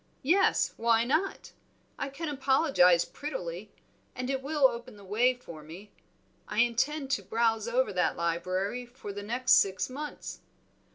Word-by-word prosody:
"Yes; 370 Hz, +8 st, +3 dB
why 230 Hz, 0 st, +3 dB
not? 310 Hz, +10 st, -1 dB, 0.5 s
I 275 Hz, -, -2 dB
can 315 Hz, +4 st, -6 dB
apologize 265 Hz, -, +3 dB
prettily, 205 Hz, -, -6 dB, 0.4 s
and 255 Hz, +1 st, -3 dB
it 265 Hz, -1 st, -2 dB
will 285 Hz, 0 st, +4 dB
open 240 Hz, -1 st, -8 dB
the 200 Hz, -, -14 dB
way 240 Hz, +6 st, +2 dB
for 170 Hz, -11 st, -11 dB
more. 170 Hz, +7 st, -11 dB, 0.6 s
I 210 Hz, -, -6 dB
intend 270 Hz, +4 st, 0 dB
to 245 Hz, -, +1 dB
browse 225 Hz, +2 st, 0 dB
over 245 Hz, -1 st, +1 dB
that 180 Hz, -3 st, +1 dB
library 185 Hz, +7 st, -1 dB
for 240 Hz, -5 st, -9 dB
the 205 Hz, -, -6 dB
next 240 Hz, +5 st, -1 dB
six 195 Hz, +5 st, +4 dB
months." 295 Hz, +3 st, -6 dB
235 Hz, 150 wpm, -29 LUFS, 200-270 Hz, 0.6 s, will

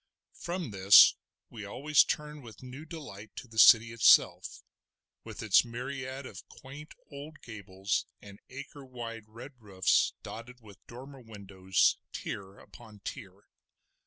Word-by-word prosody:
From 175 Hz, -, -5 dB
this 100 Hz, +1 st, +7 dB, 0.4 s
we 110 Hz, -3 st, -9 dB
always 140 Hz, +9 st, +2 dB
turned 150 Hz, 0 st, -5 dB
with 115 Hz, -1 st, -14 dB
new 130 Hz, +4 st, -10 dB
delight 125 Hz, -11 st, -11 dB
to 130 Hz, -, -9 dB
the 110 Hz, -1 st, -5 dB
city 115 Hz, 0 st, +7 dB
itself, 115 Hz, -2 st, +3 dB, 0.6 s
with -, -, -9 dB
its 110 Hz, -3 st, +4 dB
myriad 130 Hz, +2 st, -7 dB
of 100 Hz, -5 st, -10 dB
quaint 145 Hz, +4 st, -13 dB, 0.2 s
old 145 Hz, +2 st, -10 dB
gables 100 Hz, -3 st, -4 dB
and 100 Hz, -1 st, -14 dB
acre 140 Hz, +2 st, -10 dB
wide 115 Hz, -4 st, -9 dB
red 120 Hz, +6 st, -12 dB
roofs 95 Hz, -3 st, +1 dB
dotted 120 Hz, +3 st, -10 dB
with 105 Hz, -5 st, -17 dB
dormer 135 Hz, +3 st, -12 dB
windows, 100 Hz, -4 st, -1 dB
tier 100 Hz, 0 st, -7 dB
upon 105 Hz, +2 st, -16 dB
tier. 100 Hz, -5 st, -9 dB
115 Hz, 130 wpm, -29 LUFS, 100-135 Hz, 0.6 s, this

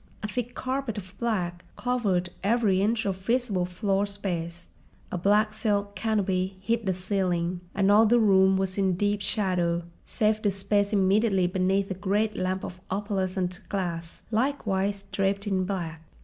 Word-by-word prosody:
A -, -, -1 dB
thick 245 Hz, +2 st, -4 dB
carpet 260 Hz, -4 st, -2 dB
of 185 Hz, -2 st, -7 dB
black 180 Hz, -7 st, -1 dB
covered 205 Hz, -8 st, 0 dB
every 205 Hz, -3 st, +3 dB
inch 220 Hz, +2 st, +1 dB
of 195 Hz, -2 st, 0 dB
visible 205 Hz, -3 st, 0 dB
floor 195 Hz, +2 st, 0 dB
space, 175 Hz, -4 st, -5 dB, 0.4 s
a -, -, -1 dB
black 210 Hz, +3 st, +3 dB
silk 205 Hz, -2 st, -1 dB
canopy 190 Hz, -3 st, 0 dB
hid 225 Hz, +2 st, -1 dB
the 190 Hz, -, +2 dB
ceiling, 180 Hz, -2 st, -1 dB
and 195 Hz, 0 st, +3 dB
all 215 Hz, +2 st, +6 dB
the 240 Hz, +3 st, +5 dB
room 190 Hz, -3 st, +5 dB
was 190 Hz, 0 st, -1 dB
in 190 Hz, -1 st, +2 dB
deep 205 Hz, +2 st, 0 dB
shadow 180 Hz, -4 st, 0 dB, 0.2 s
save 215 Hz, -1 st, +1 dB
the 205 Hz, -, +2 dB
space 200 Hz, +1 st, +1 dB
immediately 195 Hz, -1 st, +3 dB
beneath 190 Hz, +2 st, +1 dB
a -, -, +1 dB
great 205 Hz, +3 st, 0 dB
lamp 185 Hz, +1 st, -1 dB
of 185 Hz, 0 st, -7 dB
opalescent 190 Hz, -2 st, -2 dB
glass, 170 Hz, -4 st, -4 dB
likewise 205 Hz, -5 st, 0 dB
draped 195 Hz, +1 st, 0 dB
in 190 Hz, -2 st, 0 dB
black. 170 Hz, -5 st, -4 dB
195 Hz, 155 wpm, -27 LUFS, 185-210 Hz, 0.4 s, all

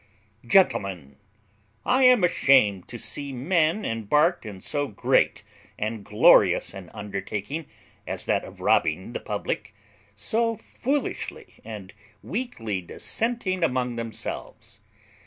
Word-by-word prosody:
] 105 Hz, +3 st, -25 dB
"Gentlemen, 95 Hz, -, +1 dB, 0.7 s
I 260 Hz, +1 st, +4 dB
am 250 Hz, -6 st, +6 dB
ashamed 130 Hz, -, +4 dB
to 120 Hz, -, -7 dB
see 130 Hz, +6 st, -3 dB
men 160 Hz, -, +1 dB
embarked 120 Hz, -, +1 dB
in 100 Hz, -3 st, -8 dB
so 145 Hz, +9 st, -2 dB
great 105 Hz, -, +1 dB, 0.3 s
and 110 Hz, 0 st, -3 dB
glorious 105 Hz, -1 st, +5 dB
an 95 Hz, -3 st, -9 dB
undertaking, 105 Hz, -, -5 dB, 0.4 s
as -, -, -3 dB
that -, -, +1 dB
of -, -, -12 dB
robbing 90 Hz, +8 st, +1 dB
the -, -, -3 dB
public, 105 Hz, 0 st, -4 dB, 0.4 s
so 225 Hz, -, 0 dB
foolishly 275 Hz, +6 st, -3 dB
and 105 Hz, -4 st, -8 dB, 0.3 s
weakly 115 Hz, -, -3 dB
dissenting 190 Hz, -, -2 dB
among 125 Hz, -5 st, 0 dB
themselves. 115 Hz, -3 st, -6 dB
115 Hz, 115 wpm, -25 LUFS, -, 0.7 s, am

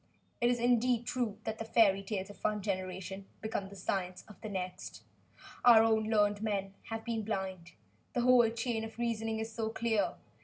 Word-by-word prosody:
It 240 Hz, -, +4 dB
is 245 Hz, -1 st, +1 dB
indeed 240 Hz, 0 st, +2 dB
true 235 Hz, -5 st, -1 dB
that 220 Hz, 0 st, -4 dB
the -, -, -2 dB
fairy 215 Hz, -3 st, +4 dB
tales 195 Hz, 0 st, -4 dB
of -, -, -18 dB
one 210 Hz, -1 st, 0 dB
generation 190 Hz, 0 st, -4 dB
become 210 Hz, -3 st, -3 dB
the 200 Hz, -, -11 dB
science 185 Hz, -1 st, -2 dB
of 210 Hz, -, -15 dB
the 215 Hz, -, -5 dB
next. 185 Hz, -2 st, -5 dB, 0.6 s
Our 230 Hz, -2 st, +8 dB
own 220 Hz, -1 st, +3 dB
learned 210 Hz, -2 st, +2 dB
men 200 Hz, -3 st, -1 dB
have 225 Hz, 0 st, -5 dB
been 230 Hz, -2 st, -1 dB
blind. 190 Hz, -5 st, -4 dB, 0.4 s
The 245 Hz, -, +1 dB
whole 245 Hz, -2 st, +6 dB
chain 225 Hz, 0 st, -2 dB
of 225 Hz, 0 st, -8 dB
reasoning 225 Hz, -2 st, -1 dB
is 220 Hz, 0 st, -4 dB
so 225 Hz, -2 st, -2 dB
clear. 225 Hz, -1 st, 0 dB
220 Hz, 185 wpm, -32 LUFS, 195-230 Hz, 0.6 s, Our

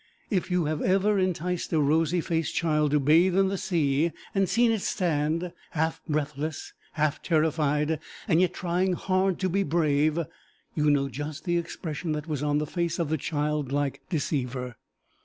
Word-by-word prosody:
If 190 Hz, -3 st, 0 dB
you 180 Hz, -2 st, +1 dB
have 155 Hz, 0 st, -1 dB
ever 195 Hz, +2 st, +2 dB
enticed 180 Hz, -1 st, -1 dB
a 160 Hz, -, +3 dB
rosy 160 Hz, +4 st, +2 dB
faced 165 Hz, -1 st, -1 dB
child 150 Hz, -2 st, +2 dB
to 150 Hz, +1 st, +3 dB
bathe 165 Hz, +6 st, +4 dB
in 195 Hz, -1 st, +4 dB
the 195 Hz, -, -1 dB
sea, 155 Hz, -2 st, +1 dB, 0.2 s
and 195 Hz, -2 st, +1 dB
seen 235 Hz, 0 st, +3 dB
it 220 Hz, -3 st, 0 dB
stand 165 Hz, -1 st, 0 dB, 0.2 s
half 160 Hz, +1 st, -1 dB
breathless, 150 Hz, 0 st, -3 dB, 0.2 s
half 155 Hz, -1 st, 0 dB
terrified, 155 Hz, -1 st, +1 dB, 0.3 s
yet 180 Hz, -1 st, +3 dB
trying 180 Hz, +1 st, 0 dB
hard 185 Hz, +1 st, +1 dB
to 185 Hz, -, +2 dB
be 190 Hz, +2 st, +1 dB
brave, 155 Hz, -3 st, +2 dB, 0.6 s
you 150 Hz, -1 st, +2 dB
know 140 Hz, -1 st, +3 dB
just 145 Hz, +3 st, -6 dB
the 175 Hz, 0 st, +2 dB
expression 160 Hz, -1 st, -4 dB
that 150 Hz, -1 st, -4 dB
was 150 Hz, -4 st, -2 dB
on 145 Hz, 0 st, +1 dB
the 150 Hz, -, 0 dB
face 170 Hz, +2 st, -2 dB
of 165 Hz, -4 st, -1 dB
the 160 Hz, -, +1 dB
child 150 Hz, -2 st, -2 dB
like 140 Hz, -1 st, -1 dB
deceiver. 125 Hz, -6 st, -2 dB
160 Hz, 170 wpm, -27 LUFS, 150-180 Hz, 0.6 s, bathe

